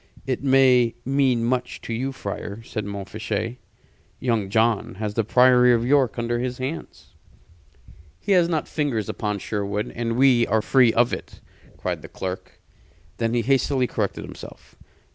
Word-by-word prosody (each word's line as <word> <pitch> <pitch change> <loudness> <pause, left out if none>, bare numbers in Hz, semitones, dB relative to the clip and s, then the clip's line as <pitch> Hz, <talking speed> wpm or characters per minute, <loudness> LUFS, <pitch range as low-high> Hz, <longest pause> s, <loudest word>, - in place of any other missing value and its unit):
"It 130 0 -2
may 130 -3 +4
mean 130 -3 +2
much 125 +1 -1
to 115 - -5
you, 130 +4 -2
friar," 105 -2 -6
said 110 -2 -5
Montfichet. 110 +3 -4 0.6
"Young 115 -6 0
John 110 -1 +1
has 105 +1 -4
the 115 - +1
Priory 125 +2 +5
of 115 0 -1
York 135 -3 +2
under 120 0 -1
his 125 0 -3
hands." 135 +6 -7 1.1
"He 200 - -3
has 175 -3 +4
not 160 -3 -1
fingers 135 - -2
upon 105 -2 -2
Sherwood, 105 +1 -3
and 115 0 -2
we 125 -3 +4
are 110 +1 +1
free 125 -2 +4
of 120 +2 +2
it!" - - -7 0.4
cried - - -3
the - - -11
clerk. 95 0 -6 0.6
Then 115 0 0
he 120 - +1
hastily 135 0 +2
corrected - - -3
himself. - - -12
120 Hz, 155 wpm, -23 LUFS, 110-130 Hz, 1.1 s, Priory